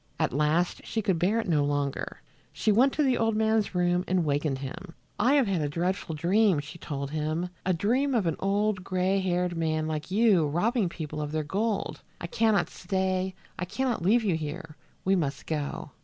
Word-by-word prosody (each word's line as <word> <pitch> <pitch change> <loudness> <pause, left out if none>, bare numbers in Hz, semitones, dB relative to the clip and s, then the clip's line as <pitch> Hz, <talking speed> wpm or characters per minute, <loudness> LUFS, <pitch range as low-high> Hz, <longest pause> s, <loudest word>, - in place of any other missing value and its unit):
At - - +1
last 150 +5 +1
she 220 - -2
could 190 -5 +1
bear 200 +6 +2
it 225 - -3
no 155 -4 +3
longer. 145 -1 -2 0.3
She 215 - +1
went 250 +6 +5
to 305 - +1
the 260 -3 +2
old 225 -1 +2
man's 220 -2 +1
room 175 0 +2
and 180 -2 +1
wakened 145 -1 0
him. 140 +6 -8 0.2
"I 250 +7 +4
have 280 -3 +4
had 190 -5 0
a 145 - -1
dreadful 170 +1 -2
dream," 185 +2 +3
she 150 +4 -9
told 140 -2 -4
him, 155 +3 -2 0.2
"a - - +4
dream 255 - +1
of 215 -5 +2
an 165 -2 +1
old 200 0 0
gray 185 +1 +1
haired 180 -1 0
man 160 -1 0
like 155 0 -3
you 195 -5 +4
robbing 205 - +1
people 155 -2 -5
of 150 0 -4
their 155 0 -1
gold. 205 +7 -2 0.2
I - - -5
can 220 +5 +2
not - - +2
stay! 190 0 -1 0.2
I 180 - -1
can 265 +8 -2
not 235 -7 -1
leave 220 +7 +3
you 190 -6 +1
here. 155 0 -5 0.3
We 190 +1 +4
must 145 -6 -2
go." 150 -3 -3
180 Hz, 205 wpm, -28 LUFS, 155-210 Hz, 0.3 s, went